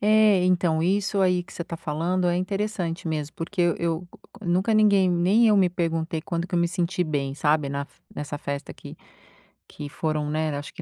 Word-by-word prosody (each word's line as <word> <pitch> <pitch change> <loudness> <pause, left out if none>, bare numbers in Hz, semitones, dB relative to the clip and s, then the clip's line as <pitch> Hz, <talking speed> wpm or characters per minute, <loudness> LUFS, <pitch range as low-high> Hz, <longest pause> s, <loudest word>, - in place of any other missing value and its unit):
É, 210 -3 +4
então, 175 -3 +2
isso 195 +2 +1
aí 180 -1 +3
que 185 - -15
você 170 - -5
tá 165 - -6
falando 170 +4 -1
é 175 - +1
interessante 185 -3 -2
mesmo, 150 -2 -3
porque 175 +3 -4
eu 170 -1 +2
eu 170 +1 -2 0.3
c - - -9
nunca 190 +6 +2
ninguém, 200 -3 +5
nem 190 +7 +4
eu 210 - +5
me 185 -3 +4
perguntei 165 -2 -2
quando 170 +1 -3
que 180 - -5
eu - - +3
me 170 - +3
senti 180 0 -1
bem, 140 -3 -2
sabe, 150 -1 +1
na 140 0 -2
f 140 - -15
nessa 145 0 -5
festa 140 0 -5
que - - -11 0.7
que 145 -1 -8
foram, 155 -1 -2
né, 155 -1 -1
acho 145 - -8
que - - -9
170 Hz, 210 wpm, -25 LUFS, 155-185 Hz, 0.7 s, ninguém